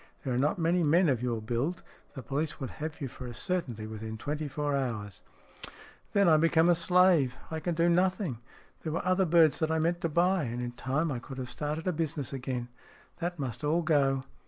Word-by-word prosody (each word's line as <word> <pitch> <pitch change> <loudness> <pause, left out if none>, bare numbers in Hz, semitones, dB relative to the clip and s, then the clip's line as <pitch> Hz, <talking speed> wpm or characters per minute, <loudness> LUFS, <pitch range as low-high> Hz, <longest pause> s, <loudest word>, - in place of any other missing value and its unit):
There 130 - -1
are - - 0
not 145 +6 +1
many 170 +1 +2
men 165 +2 +4
of 125 -4 +1
your 120 -3 -2
build. 130 +10 -2 0.3
The 135 - -7
police 145 +5 -2
would 135 - -4
have 155 0 -6
you 135 - -2
for 125 0 -9
a 120 - -7
certainty 135 - -3
within 110 0 -6
twenty 150 +6 -3
four 145 +1 -1
hours." 110 -8 -3 0.5
" - - -20
Then 200 -2 +4
I 160 -2 +6
become 165 +1 +4
a - - +7
slave; 170 -5 +4 0.2
I 160 - -2
can 170 +2 -2
do 170 +1 +3
nothing. 180 - +1 0.4
There 155 - -3
were 165 - -2
other 185 +1 +3
birds 165 -2 +4
that 160 - +1
I 160 - +1
meant 170 +2 0
to 165 - 0
buy. 175 +1 +2
And 120 0 -4
in 120 0 -3
time 140 +6 -1
I 125 - -2
could 130 +2 -9
have 125 -2 -5
started 150 +3 -3
a 185 - +1
business 150 -4 -3
again. 125 -2 -4 0.5
That 175 +1 -3
must 125 -4 -4
all 160 +4 +2
go." 135 -4 +2
150 Hz, 220 wpm, -30 LUFS, 125-170 Hz, 0.5 s, a